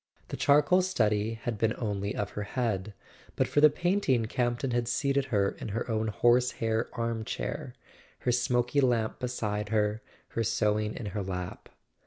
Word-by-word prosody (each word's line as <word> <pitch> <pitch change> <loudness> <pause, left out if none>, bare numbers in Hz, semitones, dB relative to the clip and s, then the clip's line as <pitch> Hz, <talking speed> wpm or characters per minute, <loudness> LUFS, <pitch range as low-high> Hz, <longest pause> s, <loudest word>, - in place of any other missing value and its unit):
The - - -4
charcoal 150 +6 +4
study 110 - +1
had 110 -1 -4
been 110 0 +1
only 100 -3 -2
of 100 -1 -2
her 105 - -5
head; 105 -2 -2 0.4
but - - +1
for 145 - +2
the 150 - +9
painting 160 - +1
Campton 120 +2 -1
had 120 -1 0
seated 140 +2 +1
her 100 -5 +1
in - - -5
her 110 +4 -3
own 110 0 0
horsehair 120 0 +2
arm 115 -2 -2
chair, - - -4 0.5
her 125 - +1
smoky 125 +2 +2
lamp 120 -4 +1
beside 105 -4 -2
her, 105 0 +1 0.3
her 115 - -1
sewing 105 0 0
in 115 - -6
her 105 - -2
lap. 90 -2 -5
115 Hz, 165 wpm, -29 LUFS, 105-125 Hz, 0.5 s, the